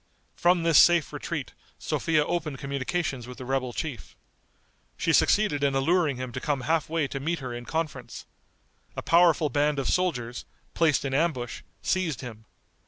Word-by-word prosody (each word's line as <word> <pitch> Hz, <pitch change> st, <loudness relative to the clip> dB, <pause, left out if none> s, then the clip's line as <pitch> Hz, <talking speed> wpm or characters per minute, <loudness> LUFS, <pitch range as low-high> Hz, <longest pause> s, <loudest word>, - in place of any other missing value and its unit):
From 175 Hz, -1 st, +3 dB
this 165 Hz, -3 st, +6 dB
safe 175 Hz, -3 st, +5 dB
retreat -, -, -5 dB, 0.2 s
Sophia 155 Hz, -3 st, 0 dB
opened 155 Hz, -5 st, -2 dB
communications 140 Hz, -1 st, -3 dB
with 125 Hz, -, -9 dB
the 130 Hz, -, -8 dB
rebel 130 Hz, -1 st, -1 dB
chief. 140 Hz, 0 st, -6 dB, 0.8 s
She -, -, +1 dB
succeeded 205 Hz, -10 st, +3 dB
in 140 Hz, -1 st, +2 dB
alluring 155 Hz, 0 st, +2 dB
him 130 Hz, -1 st, -5 dB
to 130 Hz, +1 st, -5 dB
come 145 Hz, -4 st, -1 dB
half 155 Hz, +4 st, 0 dB
way 160 Hz, -3 st, 0 dB
to 135 Hz, -, -5 dB
meet 165 Hz, +5 st, -1 dB
her 130 Hz, -4 st, -6 dB
in 120 Hz, 0 st, -7 dB
conference. 160 Hz, +1 st, -4 dB, 0.7 s
A -, -, -5 dB
powerful 165 Hz, -2 st, +4 dB
band 145 Hz, +2 st, +1 dB
of 135 Hz, -, -1 dB
soldiers, 125 Hz, -10 st, -1 dB, 0.3 s
placed 155 Hz, -4 st, +2 dB
in 135 Hz, -, -2 dB
ambush, 135 Hz, -7 st, -1 dB, 0.2 s
seized 180 Hz, -8 st, 0 dB
him. 110 Hz, -4 st, -9 dB
145 Hz, 165 wpm, -27 LUFS, 130-165 Hz, 0.8 s, this